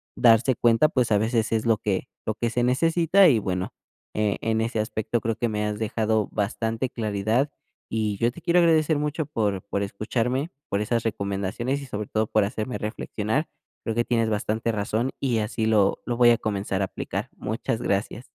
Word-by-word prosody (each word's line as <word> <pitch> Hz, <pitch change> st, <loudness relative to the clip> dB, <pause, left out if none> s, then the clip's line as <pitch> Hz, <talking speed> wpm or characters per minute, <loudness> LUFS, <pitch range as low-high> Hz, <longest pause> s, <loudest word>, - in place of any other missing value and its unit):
darse 120 Hz, +2 st, +5 dB
cuenta, 120 Hz, +6 st, +4 dB
pues, 125 Hz, -5 st, +1 dB
a 105 Hz, -, +5 dB
veces 110 Hz, +1 st, 0 dB
es 110 Hz, 0 st, 0 dB
lo 115 Hz, -2 st, +3 dB
que 105 Hz, +2 st, -2 dB, 0.2 s
lo 110 Hz, -, 0 dB
que 120 Hz, 0 st, -1 dB
se 120 Hz, +1 st, 0 dB
necesita 165 Hz, +8 st, +4 dB
y, 125 Hz, -8 st, +4 dB
bueno, 90 Hz, -2 st, -3 dB, 0.4 s
e 105 Hz, -1 st, +1 dB
en 110 Hz, 0 st, +1 dB
ese 115 Hz, 0 st, -1 dB
aspecto 110 Hz, +2 st, -1 dB
creo 115 Hz, -1 st, -1 dB
que 120 Hz, -, -1 dB
me 105 Hz, 0 st, -1 dB
has 105 Hz, 0 st, -3 dB
dejado 110 Hz, -1 st, 0 dB
bastante 115 Hz, +4 st, -1 dB
claridad, 110 Hz, +5 st, 0 dB, 0.4 s
y 110 Hz, -2 st, -1 dB
yo 115 Hz, +4 st, +2 dB
te 150 Hz, -, -12 dB
quiero 175 Hz, +2 st, +3 dB
agradecer 160 Hz, -2 st, +3 dB
mucho 150 Hz, +1 st, -1 dB
por 105 Hz, -9 st, -1 dB
por 100 Hz, 0 st, -2 dB
escucharme, 120 Hz, -, -1 dB, 0.2 s
por 100 Hz, -, 0 dB
esas 115 Hz, +2 st, 0 dB
recomendaciones 100 Hz, +5 st, -2 dB
y, 140 Hz, -, -7 dB
sobre 105 Hz, -2 st, -4 dB
todo, 110 Hz, 0 st, 0 dB
por 110 Hz, -, +2 dB
hacerme 110 Hz, +4 st, -3 dB
reflexionar. 110 Hz, +5 st, -2 dB, 0.4 s
Creo 115 Hz, -, -2 dB
que 120 Hz, -, +2 dB
tienes 115 Hz, -2 st, +1 dB
bastante 110 Hz, +2 st, -1 dB
razón, 110 Hz, +4 st, -1 dB
y 125 Hz, -4 st, +1 dB
así 110 Hz, +1 st, -1 dB
lo 105 Hz, -3 st, +3 dB
lo 120 Hz, -1 st, -2 dB
voy 120 Hz, -1 st, +7 dB
a 115 Hz, -, +4 dB
comenzar 100 Hz, -2 st, -2 dB
a 95 Hz, -, +2 dB
aplicar. -, -, -5 dB
Muchas 110 Hz, +1 st, -2 dB
gracias. 100 Hz, +4 st, -1 dB
110 Hz, 195 wpm, -25 LUFS, 105-125 Hz, 0.4 s, voy